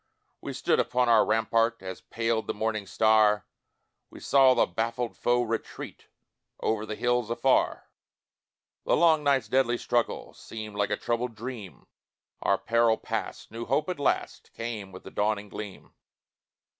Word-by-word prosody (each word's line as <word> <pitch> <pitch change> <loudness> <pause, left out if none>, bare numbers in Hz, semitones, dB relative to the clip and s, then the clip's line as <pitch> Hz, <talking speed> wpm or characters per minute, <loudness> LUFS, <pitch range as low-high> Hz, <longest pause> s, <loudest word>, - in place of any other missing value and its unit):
We - - -5
stood - - +1
upon 125 -1 +1
our 115 -2 +6
rampart, 115 0 +1
As 95 -1 -7
paled 115 -1 -2
the - - -2
morning 110 -1 -2
star, 110 0 +3 0.6
We - - -12
saw 135 -2 +5
the - - +4
baffled 115 +5 -3
foe 120 0 +2
retreat 115 -1 -5 0.5
Over 110 -1 -1
the 110 - -4
hills 120 -1 0
afar; 120 +3 +1 1.0
The - - +2
long 160 -2 +4
night's 140 -2 +2
deadly 130 -2 +2
struggle 120 -1 -1
Seemed 110 -2 -8
like 100 -1 0
a 105 - 0
troubled 120 0 -2
dream 110 -4 -8 0.6
Our - - +2
peril 115 -1 +2
passed, - - -5
new 115 +1 -6
hope 145 +6 +1
at 180 - -3
last 140 - -1
Came 110 -4 -5
with 95 - -11
the 95 - -10
dawning 105 0 -1
gleam. 105 -2 -9
115 Hz, 150 wpm, -27 LUFS, 105-120 Hz, 1.0 s, our